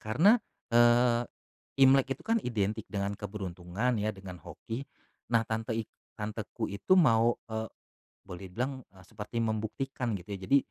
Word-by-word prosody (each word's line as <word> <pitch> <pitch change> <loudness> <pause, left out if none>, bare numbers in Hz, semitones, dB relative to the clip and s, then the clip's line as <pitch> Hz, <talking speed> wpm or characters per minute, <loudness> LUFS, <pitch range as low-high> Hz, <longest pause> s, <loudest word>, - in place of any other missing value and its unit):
karena, 180 - +4 0.3
eee, 120 0 +5 0.6
imlek 135 0 +5
itu - - -17
kan 230 0 +2
identik 110 -2 -1
dengan 100 -1 -2
keberuntungan 100 +3 -3
ya 105 - 0
dengan 95 -4 -10
hoki, 115 +4 -6 0.5
nah 115 -1 +3
tante 110 0 -2
ik 115 - -2 0.3
tanteku 110 +2 -4
itu 100 - +3
mau, 115 -6 +5 0.2
eee, 110 0 -2 0.6
boleh 90 +2 -8
bilang 130 +8 -3 0.2
seperti 110 +3 -4
membuktikan 115 +2 -2
gitu 95 +2 -8 0.2
jadi 140 - +6
110 Hz, 135 wpm, -30 LUFS, 105-125 Hz, 0.6 s, jadi